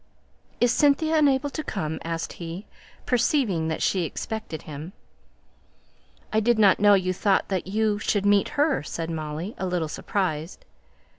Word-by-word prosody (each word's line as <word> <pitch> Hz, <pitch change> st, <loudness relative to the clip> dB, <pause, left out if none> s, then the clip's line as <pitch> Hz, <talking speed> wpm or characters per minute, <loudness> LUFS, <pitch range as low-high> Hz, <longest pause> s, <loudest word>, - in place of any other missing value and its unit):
"Is 245 Hz, -1 st, +4 dB
Cynthia 295 Hz, +4 st, +3 dB
unable 285 Hz, -1 st, +2 dB
to 310 Hz, -, -4 dB
come?" 160 Hz, -, -3 dB
asked 165 Hz, 0 st, -4 dB
he, 170 Hz, +4 st, -7 dB, 0.4 s
perceiving 240 Hz, -, +1 dB
that 160 Hz, -, -2 dB
she 185 Hz, -2 st, +1 dB
expected 165 Hz, 0 st, -5 dB
him. 155 Hz, +4 st, -8 dB, 1.4 s
"I 215 Hz, -, +4 dB
did 235 Hz, +1 st, +2 dB
not 200 Hz, -3 st, +5 dB
know 205 Hz, 0 st, +6 dB
you 185 Hz, -1 st, 0 dB
thought 195 Hz, +1 st, +1 dB
that 190 Hz, -2 st, -2 dB
you 210 Hz, +1 st, 0 dB
should 205 Hz, -1 st, 0 dB
meet 205 Hz, -1 st, +4 dB
her," 290 Hz, 0 st, +2 dB
said 165 Hz, +2 st, -5 dB
Molly, 160 Hz, +5 st, -4 dB
a 190 Hz, -, -2 dB
little 175 Hz, -3 st, -1 dB
surprised. 165 Hz, -1 st, -3 dB
195 Hz, 150 wpm, -25 LUFS, 165-220 Hz, 1.4 s, know